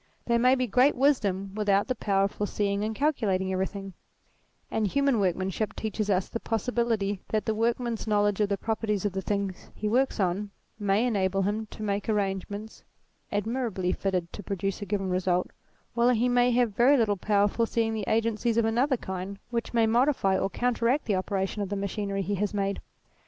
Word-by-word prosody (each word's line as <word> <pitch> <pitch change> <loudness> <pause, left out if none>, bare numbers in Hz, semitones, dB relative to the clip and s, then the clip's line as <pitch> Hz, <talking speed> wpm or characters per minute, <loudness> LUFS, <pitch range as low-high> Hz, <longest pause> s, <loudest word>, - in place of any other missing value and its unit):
There 235 0 +2
may 255 +2 +5
be 255 -1 0
great 250 +5 +4
wisdom 200 -8 +1
without 205 -1 +2
the 255 - +1
power 200 -4 +1
of 200 - +1
foreseeing 205 0 -1
and 220 +1 -2
calculating 205 -10 0
everything: 195 +1 -3 0.8
and 220 -2 +1
human 275 0 +2
workmanship 190 +2 -1
teaches 215 -1 -3
us 185 -2 +2
the 230 - -4
possibility 225 -4 -1
that 215 -2 0
the 220 - +1
workman's 230 +1 -1
knowledge 205 -1 +2
of 205 - +2
the 200 - 0
properties 215 -2 -1
of 205 - 0
the 190 - -2
things 200 -1 -3
he 215 - -3
works 255 +4 +1
on 195 +2 0 0.3
may 205 +3 +2
enable 195 -4 +1
him 215 +3 -1
to 215 - -9
make 200 0 -2
arrangements 205 +1 -2 0.5
admirably 210 -4 -1
fitted 185 -4 -2
to - - -6
produce 195 0 -3
a 205 - -5
given 195 0 -1
result, 180 0 0 0.4
while 235 +1 +3
he 245 0 +3
may 245 0 +4
have 240 -4 +2
very 265 +6 +5
little 215 -4 +2
power 200 +2 +2
of 205 - +2
foreseeing 230 -1 0
the 215 -3 -3
agencies 230 +1 +1
of 230 - +3
another 250 +4 +2
kind 190 -1 -5
which 235 -1 -2
may 230 -1 +3
modify 235 -4 +2
or 195 - 0
counteract 245 +4 0
the 210 - +1
operation 195 +2 -2
of 200 - -3
the 205 - -2
machinery 200 0 -2
he 205 - -2
has 205 +1 -1
made. 200 0 -1
210 Hz, 190 wpm, -27 LUFS, 195-230 Hz, 0.8 s, may